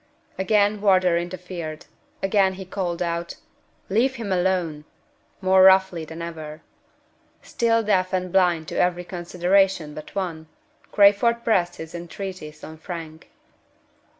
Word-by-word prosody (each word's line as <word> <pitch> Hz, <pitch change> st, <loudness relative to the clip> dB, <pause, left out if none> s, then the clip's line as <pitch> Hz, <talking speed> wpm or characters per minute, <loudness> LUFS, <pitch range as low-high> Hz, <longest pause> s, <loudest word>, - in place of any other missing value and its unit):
Again 205 Hz, +1 st, +2 dB
Wardour 185 Hz, -4 st, +4 dB
interfered. 175 Hz, -2 st, -5 dB, 0.4 s
Again 195 Hz, -1 st, +3 dB
he 190 Hz, 0 st, -8 dB
called 180 Hz, -2 st, -3 dB
out, 170 Hz, 0 st, -3 dB, 0.5 s
"Leave 245 Hz, +7 st, +1 dB
him 225 Hz, -5 st, -5 dB
alone!" 180 Hz, -4 st, 0 dB, 0.6 s
more 190 Hz, 0 st, +4 dB
roughly 190 Hz, -3 st, +5 dB
than 165 Hz, +2 st, -8 dB
ever. 160 Hz, -2 st, -8 dB, 0.8 s
Still 230 Hz, -1 st, +1 dB
deaf 185 Hz, -3 st, +1 dB
and 185 Hz, -1 st, -2 dB
blind 175 Hz, -4 st, +2 dB
to -, -, -3 dB
every 180 Hz, 0 st, +1 dB
consideration 180 Hz, -1 st, 0 dB
but 155 Hz, +4 st, -10 dB
one, 165 Hz, -5 st, -4 dB, 0.4 s
Crayford 210 Hz, +4 st, +4 dB
pressed 180 Hz, -7 st, +1 dB
his 160 Hz, 0 st, -9 dB
entreaties 175 Hz, -3 st, -8 dB
on 160 Hz, 0 st, -10 dB
Frank. 160 Hz, -2 st, -8 dB
180 Hz, 125 wpm, -23 LUFS, 170-195 Hz, 0.8 s, roughly